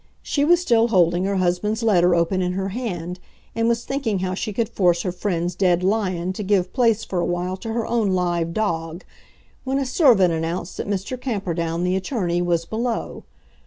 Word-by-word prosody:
She 285 - 0
was 345 +3 +5
still 235 -9 +3
holding 180 -4 +2
her 200 0 0
husband's 190 +5 0
letter 180 -5 +4
open 170 +3 +1
in 180 0 -1
her 190 +1 -2
hand, 180 -6 -4 0.3
and 230 +1 0
was 235 0 0
thinking 270 -7 -1
how 185 0 -2
she 215 +3 -3
could 220 +2 -1
force 175 -4 +1
her 180 - -1
friend's 175 -1 -2
dead 180 -1 +2
lion 185 -3 0
to 200 - -5
give 195 -2 +1
place 230 -4 +2
for 185 - -3
a - - +1
while 175 +1 -2
to 225 - -7
her 230 0 -1
own 225 -4 +1
live 175 -2 0
dog, 170 -4 -2 0.6
when 265 +1 -1
a 275 - 0
servant 240 - +4
announced 165 +2 -3
that - - -4
Mr. 205 +6 -3
Camperdown, 175 -8 -2
the 180 +1 +1
attorney, 185 -3 -1
was 170 -1 0
below. 230 +5 -3
185 Hz, 195 wpm, -22 LUFS, 175-225 Hz, 0.6 s, was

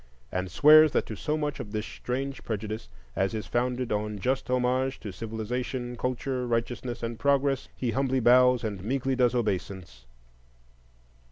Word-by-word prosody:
and 90 0 -2
swears 155 - +7
that - - +1
to - - -6
so 155 0 -2
much 150 -2 -2
of 105 - -6
this 105 0 -2
strange 135 +2 -4
prejudice 110 - -4 0.3
as 95 +3 0
is 110 - -4
founded 125 0 -1
on 105 0 -1
just 130 +7 -1
homage 130 +1 +1
to 105 - -6
civilization, 120 +3 -4
culture, 125 +1 -2
righteousness, 120 +1 -2
and 115 -1 -4
progress, 140 -1 +1
he 125 -3 -2
humbly 130 +1 +1
bows 125 0 +5
and 100 -4 -4
meekly 135 +3 0
does 125 -1 +2
obeisance. 95 - -3
125 Hz, 155 wpm, -27 LUFS, 110-130 Hz, 0.3 s, swears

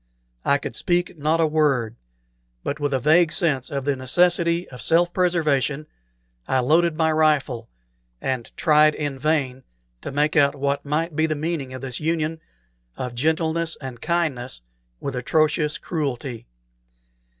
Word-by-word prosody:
I 140 - +3
could 140 - -6
not - - -15
speak 175 0 0
a 160 +2 +3
word, 140 -8 +1 0.7
but 145 - -3
with 145 -1 -1
a 135 - +1
vague 155 +5 +4
sense 145 -8 0
of 140 -1 -3
the 145 -1 +1
necessity 170 +5 +2
of 125 - -10
self 175 +1 +3
preservation, 155 -5 +1 0.6
I - - +1
loaded 160 +5 +2
my 160 -1 +2
rifle, 150 -7 +1 0.5
and 130 -3 -3
tried 155 -2 +4
in 145 -3 -4
vain 135 -3 0 0.4
to - - -6
make 150 +2 +1
out 140 -2 +4
what 140 0 -1
might 150 +3 -2
be 160 +1 +2
the 155 - -1
meaning 150 -3 -3
of 130 - -7
this 130 -2 -3
union 160 0 -1 0.6
of 125 -1 -4
gentleness 160 +4 0
and 130 -4 -8
kindness 140 - -2 0.4
with 140 - -4
atrocious 150 +4 +1
cruelty. 135 - -4
150 Hz, 150 wpm, -23 LUFS, 135-160 Hz, 0.7 s, vague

